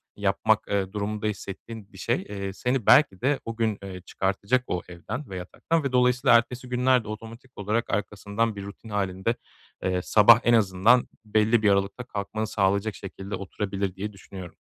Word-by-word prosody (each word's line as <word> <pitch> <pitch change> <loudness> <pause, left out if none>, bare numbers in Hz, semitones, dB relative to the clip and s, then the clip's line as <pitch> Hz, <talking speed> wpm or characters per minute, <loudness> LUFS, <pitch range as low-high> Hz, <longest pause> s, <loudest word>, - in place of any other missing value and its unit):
yapmak, - - +1
eee, 100 -1 -1
durumunda 105 +1 -2
hissettiğin 105 +1 -7
bir - - -13
şey, - - 0
eee, 100 -1 -4
seni 125 +2 -1
belki 125 -9 +5
de 135 +2 +1
o 115 0 -5
gün, 110 -3 0
eee, 95 -2 -7
çıkartacak 100 +7 0
o 90 - -2
evden 95 - -7
ve 95 - -5
yataktan 155 - -2
ve 140 - -1
dolayısıyla 125 -1 +5
ertesi 125 +2 -3
günler 125 0 +3
de - - -12
otomatik 115 +4 -9
olarak 105 +3 -1
arkasından 105 +2 -1
bir 100 - -6
rutin 100 +3 -11
hâlinde, 100 +2 -1 0.5
eee, 90 -1 0
sabah 110 +3 +7
en 120 - +4
azından 110 +3 +4 0.2
belli 110 +2 +3
bir 105 - +5
aralıkta 100 +5 +1
kalkmanı 110 -1 -4
sağlayacak 100 +1 +1
şekilde 95 +1 -7
oturabilir 100 0 -3
diye 105 +2 -5
düşünüyorum. 95 -2 -10
105 Hz, 170 wpm, -26 LUFS, 100-120 Hz, 0.5 s, sabah